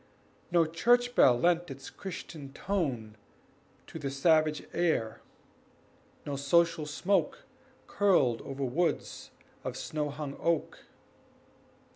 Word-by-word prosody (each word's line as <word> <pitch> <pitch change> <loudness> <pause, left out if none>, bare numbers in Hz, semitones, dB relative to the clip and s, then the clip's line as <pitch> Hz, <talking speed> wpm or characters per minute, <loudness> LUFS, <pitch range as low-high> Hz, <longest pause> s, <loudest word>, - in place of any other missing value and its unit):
No 170 -1 +4
church 240 +10 +2
bell 125 - +6
lent 175 +1 +2
its 135 0 -9
Christian 160 -6 -8
tone 135 - -2 0.7
To 160 - -9
the 140 -2 -3
savage 155 +2 +2
air, 160 -11 0 1.0
no 145 - -3
social 160 +2 +2
smoke 200 - 0 0.4
Curled 155 - +2
over 135 0 -5
woods 165 +8 -2 0.3
of - - -4
snow 150 -1 -3
hung 145 -1 -6
oak. 170 -2 -1
155 Hz, 105 wpm, -30 LUFS, 140-175 Hz, 1.0 s, bell